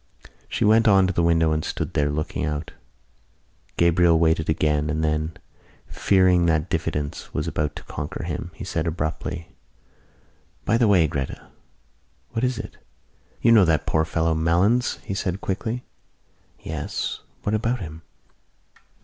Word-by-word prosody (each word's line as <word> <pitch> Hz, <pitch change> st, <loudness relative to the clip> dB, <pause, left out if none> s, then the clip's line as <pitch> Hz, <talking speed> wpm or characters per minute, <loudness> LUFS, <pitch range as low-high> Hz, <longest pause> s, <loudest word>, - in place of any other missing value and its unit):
She -, -, 0 dB
went 110 Hz, +2 st, +5 dB
on 95 Hz, -2 st, +6 dB
to 95 Hz, -, 0 dB
the 85 Hz, -, +1 dB
window 80 Hz, -1 st, +3 dB
and 75 Hz, 0 st, 0 dB
stood -, -, -4 dB
there, 75 Hz, 0 st, +1 dB
looking 75 Hz, +1 st, -3 dB
out. 75 Hz, +1 st, -3 dB, 1.1 s
Gabriel 85 Hz, 0 st, +4 dB
waited 80 Hz, -1 st, +2 dB
again 75 Hz, -1 st, +1 dB
and 80 Hz, +1 st, -1 dB
then, 75 Hz, +1 st, 0 dB, 0.5 s
fearing 90 Hz, -3 st, +3 dB
that 80 Hz, -2 st, +1 dB
diffidence 75 Hz, -1 st, -3 dB
was -, -, -1 dB
about 75 Hz, -1 st, -2 dB
to -, -, -8 dB
conquer 75 Hz, -, -5 dB
him, -, -, -4 dB
he -, -, -8 dB
said 80 Hz, 0 st, -2 dB
abruptly: 80 Hz, +1 st, -3 dB, 1.2 s
"By 115 Hz, +1 st, +2 dB
the 120 Hz, -, +4 dB
way, 95 Hz, -5 st, +5 dB
Gretta!" 70 Hz, -2 st, -5 dB, 0.8 s
"What 115 Hz, -, -2 dB
is 125 Hz, -1 st, +1 dB
it?" -, -, -7 dB, 0.7 s
"You 115 Hz, -, +6 dB
know 110 Hz, -4 st, +7 dB
that 80 Hz, -2 st, +1 dB
poor 80 Hz, -, +2 dB
fellow 80 Hz, +1 st, 0 dB
Malins?" 90 Hz, +10 st, +2 dB
he -, -, -4 dB
said 95 Hz, -1 st, -2 dB
quickly. 110 Hz, +6 st, -3 dB, 0.8 s
"Yes. 75 Hz, -2 st, -4 dB, 0.2 s
What 105 Hz, -, -1 dB
about 115 Hz, +3 st, 0 dB
him?" 80 Hz, -4 st, -8 dB
85 Hz, 150 wpm, -24 LUFS, 80-95 Hz, 1.2 s, know